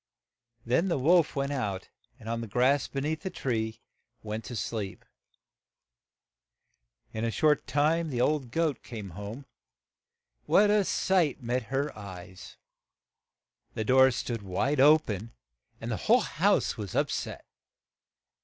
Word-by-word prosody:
Then 130 +10 +2
the 170 - +1
wolf 165 +4 +3
went 140 0 -1
out, 100 -9 -3 0.3
and 110 - -12
on 115 0 -2
the 115 - -5
grass 130 +6 +2
be 135 - -4
neath 155 +4 -2
and 115 - -2 0.4
went 110 +1 -4
to 125 - -6
sleep. 105 -3 -4 2.1
In 110 - -3
a 115 - +1
short 150 +4 +2
time 155 +5 +1
the 125 -4 -3
old 140 0 +1
goat 155 -1 0
came 105 -6 -8
home. 105 +9 -8 1.0
What 205 +1 +5
a 210 -2 +3
sight 165 -10 +1
met 120 +1 -1
her 140 +3 -1
eyes! 95 -3 -10 1.2
The 110 - -2
door 130 +3 +6
stood 120 -2 -3
wide 115 +9 -1
o 150 +3 +8
pen, 110 -4 -6 0.5
and - - -5
the - - -1
whole - - +4
house - - +1
was 100 -4 -6
up - - +1
set. - - -4
125 Hz, 140 wpm, -28 LUFS, 110-150 Hz, 2.1 s, o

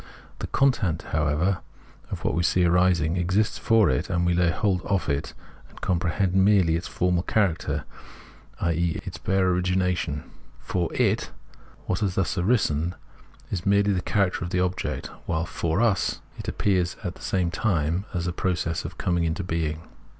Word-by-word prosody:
The - - -4
content, 120 - +1
however, 80 +4 +1 0.5
of - - -5
what - - +1
we 85 - +1
see 90 +1 +3
arising, 90 -2 +3
exists 95 +4 +1
for 115 -2 +4
it, - - 0
and 90 -2 +1
we 90 - +3
lay 90 0 +3
hold 90 +1 +1
of 100 -1 -1
and 70 +2 0 0.6
com 90 -2 +1
prehend 90 +1 0
merely 95 -3 +4
its 85 - -3
formal 90 -1 +1
character, 95 -3 0 0.8
i.e. 85 0 0
its - - -6
hare 95 -1 +2
origina 90 0 +1
tion; 75 -4 -3 0.4
for 90 -2 -2
it, - - +1 0.6
what 90 - -1
has 95 -4 -1
thus 90 -5 0
arisen 90 -4 +1 0.6
has 90 -3 -2
merely 100 0 +3
the 90 - 0
character 100 -2 0
of 90 +1 -3
object, 90 0 -1 0.2
while, 80 0 0
for 85 +4 -1
us, 115 -5 +1 0.2
it - - -8
appears 90 -3 +1
at 90 -3 -3
the - - -17
same 90 -3 0
time 85 -2 0
as 85 -2 -2
a 90 - -1
process 85 -2 -1
and - - -7
coming 85 -2 0
into 85 +4 -1
being. 80 -2 -2
90 Hz, 165 wpm, -25 LUFS, 85-95 Hz, 0.8 s, for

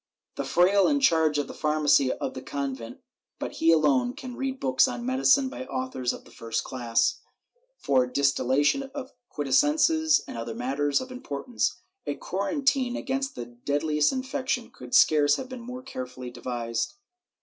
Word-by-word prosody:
The - - -2
fraile 190 +3 +4
in 290 -1 +2
charge 160 - +3
of 145 - 0
the - - -8
pharmacy 150 -3 +3
of - - -4
the 130 - -7
convent, 135 -5 -5 0.4
but - - -4
he 165 - +4
alone, 140 -6 +3
can 255 -1 -8
read 265 0 -3
books 130 -1 +3
on 240 - -5
medicine 265 +1 +3
by 260 0 -7
authors 255 - -2
of - - -9
the - - -17
first 115 -1 -3
class, 120 -3 0 0.6
for 130 -2 +2
distillation 140 - +1
of 265 -2 -6 0.2
quintessences 300 - +3
and 115 - -6
other 115 -1 -5
matters 140 - 0
of 260 0 -8
importance.^ 240 - -3 0.3
A - - -3
quarantine 275 - 0
against 270 +1 -2
the 120 - -5
deadliest 145 +5 0
infection 260 -2 -2
could 125 -1 -5
scarce 145 -2 +5
have 260 - -6
been 255 -2 -7
more 250 +2 -8
carefully 125 - -7
devised. 120 -2 -3
150 Hz, 160 wpm, -26 LUFS, -, 0.6 s, scarce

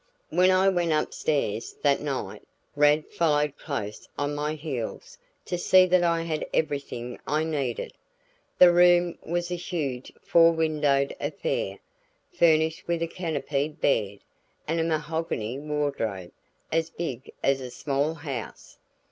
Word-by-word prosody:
When 180 +3 +4
I 185 +1 +4
went 175 -4 +2
upstairs 140 -7 -1
that 140 -2 +3
night, 140 -3 -4 0.3
Rad 150 +1 +4
followed 150 -3 +1
close 105 -8 -5
on 145 0 -1
my 150 +1 -2
heels 145 -7 -6 0.3
to 180 - -3
see 185 +1 +6
that 185 0 +3
I 170 -1 +2
had 160 -2 -2
everything 140 -5 -2
I 155 +1 +1
needed. 140 -7 -2 0.6
The 175 -1 +8
room 175 0 +4
was 175 +1 -3
a - - 0
huge 150 -8 -4
four 165 0 +5
windowed 150 -4 +1
affair, - - -2 0.6
furnished 160 - +2
with 170 -1 0
a - - -1
canopied 155 -4 -3
bed 100 -7 0 0.5
and 165 +2 0
a - - +2
mahogany 155 -7 -2
wardrobe 140 -11 -2 0.4
as 165 0 +1
big 140 -7 -5
as 135 -1 +2
a 130 - -6
small 140 +4 -1
house. 140 -7 -7
155 Hz, 135 wpm, -26 LUFS, 140-165 Hz, 0.6 s, The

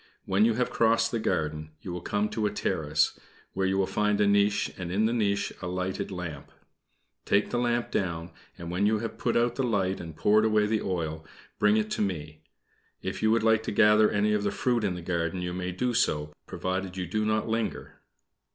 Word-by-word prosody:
When 95 +3 +3
you 115 -1 +2
have 125 +1 0
crossed 115 0 +3
the 115 - -1
garden, 75 -5 -2
you 90 - -5
will 90 - -5
come 105 +3 0
to 110 -2 -1
a - - 0
terrace, 80 -7 0 0.3
where 95 0 0
you 95 0 +1
will 95 - +2
find 105 +1 0
a 105 - +4
niche, 100 0 +2
and 90 -2 -5
in 105 +4 +2
the 115 - +1
niche 100 -4 0
a 90 - -4
lighted 95 +2 -3
lamp. 85 -7 -6 0.7
Take 100 +1 +1
the 120 - 0
lamp 120 -1 0
down, 85 -2 -2 0.3
and 85 0 -6
when 95 +4 +1
you 110 +1 +2
have 110 0 -5
put 120 - +1
out 120 0 +2
the 135 - +1
light 95 -6 0
and 80 -3 -8
poured 105 +1 +4
away 110 -1 +3
the 110 0 0
oil, 80 -4 -3 0.4
bring 105 +1 +4
it 110 0 -1
to - - -1
me. 75 -6 -3 0.6
If - - -4
you 110 - +3
would 115 0 +3
like 110 -1 +4
to - - -4
gather 105 +1 +5
any 105 +1 +1
of 105 - +1
the 100 - 0
fruit 120 +2 0
of 95 -3 0
the 90 - -7
garden 85 0 -2
you 90 0 -3
may 90 0 -3
do 125 +7 -1
so, 75 -10 0
provided 95 0 -3
you 90 - -2
do 105 +5 -1
not 110 0 0
linger." 115 0 -3
100 Hz, 220 wpm, -28 LUFS, 90-110 Hz, 0.7 s, gather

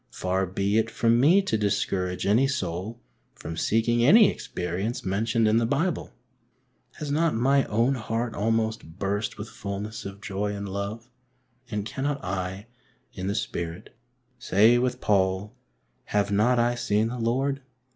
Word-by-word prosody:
Far 95 +1 -1
be 100 +4 +1
it 110 0 0
from 115 +1 +2
me 175 +10 +5
to 110 - 0
discourage 95 -3 -1
any 115 +7 +4
soul 105 -3 -3 0.4
from 80 - -7
seeking 115 +6 +1
any 205 - +7
experience 95 +7 -4
mentioned 110 +4 +1
in 110 +1 +3
the 115 - +2
Bible! 165 +8 -1 0.8
Has 150 -2 -5
not 160 0 +2
my 135 +4 +3
own 115 +5 +2
heart 115 -1 -2
almost 110 -5 -1
burst 100 +2 -2
with 100 - -6
fulness 105 +2 -6
of 100 0 -8
joy 100 0 -3
and 100 0 -5
love? 100 +4 -5 0.6
and 105 -2 -3
cannot 140 +5 -2
I, 95 +2 -3 0.5
in 95 - -5
the 100 - -1
Spirit, 85 -5 -4 0.4
say 115 +3 +4
with 125 0 -1
Paul, 95 +1 +1 0.5
Have 105 0 0
not 110 +5 +3
I 120 +1 +3
seen 110 -2 0
the 125 +1 -5
Lord 135 +4 0
110 Hz, 150 wpm, -26 LUFS, 100-120 Hz, 0.8 s, any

